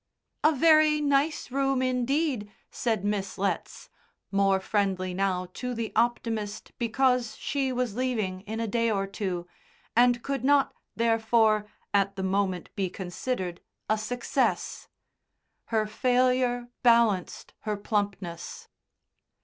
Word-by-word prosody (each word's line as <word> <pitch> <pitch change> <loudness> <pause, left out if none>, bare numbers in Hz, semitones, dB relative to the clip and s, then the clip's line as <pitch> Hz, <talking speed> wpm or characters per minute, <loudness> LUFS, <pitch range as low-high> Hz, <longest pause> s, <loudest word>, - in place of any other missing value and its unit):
"A 310 - +6
very 310 0 +5
nice 285 -1 +1
room 270 -1 +1
indeed," 255 -2 0 0.2
said 220 -5 -1
Miss 205 -2 -2
Letts, 195 +1 -2 0.4
more 195 -1 +3
friendly 190 -2 -1
now 185 -1 0
to 250 -1 -4
the 230 -1 -3
optimist 225 -2 -1
because 250 0 +1
she 270 -2 -1
was 250 -4 -1
leaving 220 -7 -1
in 220 +1 -4
a 230 - -1
day 230 +2 +1
or 195 -2 0
two, 190 -3 -3 0.5
and 240 0 +4
could 275 -3 -2
not, 280 0 +3 0.2
therefore, 225 -2 +3 0.3
at 195 -1 +2
the 190 - -4
moment 190 -2 -1
be 195 -3 -1
considered 185 0 -4 0.3
a 215 - +2
success. 240 +3 -1 0.8
Her 220 -2 +1
failure 250 +2 +1
balanced 230 -6 +2
her 210 -2 -3
plumpness. 200 -5 -3
225 Hz, 120 wpm, -27 LUFS, 195-250 Hz, 0.8 s, A